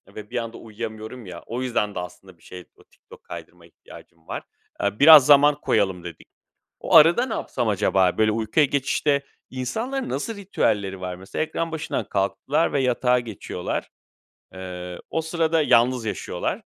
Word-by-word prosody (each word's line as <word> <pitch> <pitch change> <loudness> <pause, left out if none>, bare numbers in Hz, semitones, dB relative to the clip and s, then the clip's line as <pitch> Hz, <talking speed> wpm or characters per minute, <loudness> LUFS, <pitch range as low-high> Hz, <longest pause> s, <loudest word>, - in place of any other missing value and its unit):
ve 105 -1 -9
bir 125 - -4
anda 115 -1 -4
uyuyamıyorum 110 +1 -8
ya 90 -2 -9
o 120 +3 -4
yüzden 110 -5 -1
de - - -2
aslında 90 +1 -10
bir - - -27
şeye, 90 -1 -11
o - - -21
TikTok - - -19
kaydırmaya 85 -1 -11
ihtiyacım 80 0 -17
var. - - -5 0.4
Eee, 100 +1 -1
biraz 150 -2 +9
zaman 145 +1 +5
koyalım 95 -4 0
dedik. 85 -2 -10 0.5
O - - -1
arada 170 +10 +6
ne 225 - -4
yapsam 120 -3 -2
acaba? 95 -3 +2
Böyle, 110 0 +3
uykuya 115 +7 +2
geçişte 140 +1 0 0.3
insanların 230 - -3
nasıl 225 -2 -3
ritüelleri 105 - -1
var 90 -1 -5
mesela? 95 +9 -5
Ekran 165 +1 -3
başından 160 0 -3
kalktılar 130 +11 0
ve 140 - +1
yatağa 125 -1 +2
geçiyorlar. 105 -6 -5 0.6
Eee, 90 -1 -7
o 160 - -1
sırada 160 0 0
yalnız 125 -3 +3
yaşıyorlar. 100 -4 -3
115 Hz, 160 wpm, -23 LUFS, 95-145 Hz, 0.6 s, biraz